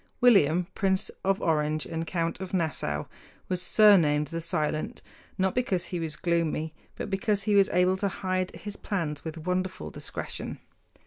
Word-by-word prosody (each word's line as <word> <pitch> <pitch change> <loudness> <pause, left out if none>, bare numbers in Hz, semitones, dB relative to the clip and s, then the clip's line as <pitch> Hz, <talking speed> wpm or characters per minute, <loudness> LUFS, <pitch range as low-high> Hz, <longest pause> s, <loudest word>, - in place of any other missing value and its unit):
William, 180 -8 +5
Prince 190 -1 0
of 195 0 +1
Orange 155 -1 +1
and 165 0 -4
Count 165 -1 -1
of 190 0 -4
Nassau, 140 - -1 0.4
was 180 -1 0
surnamed 170 -8 +5
"The 165 0 -3
Silent" 155 -2 -2 0.3
not 190 -1 +1
because 195 -8 0
he 175 - 0
was 160 -2 -3
gloomy, 165 -2 0 0.2
but - - -4
because 205 0 +1
he 210 - +1
was 200 -1 +5
able 180 +1 +3
to 200 - 0
hide 185 -1 -1
his 205 0 -7
plans 160 -8 -3
with 160 0 -6
wonderful 180 - -2
discretion. - - -3
180 Hz, 155 wpm, -28 LUFS, 160-190 Hz, 0.4 s, William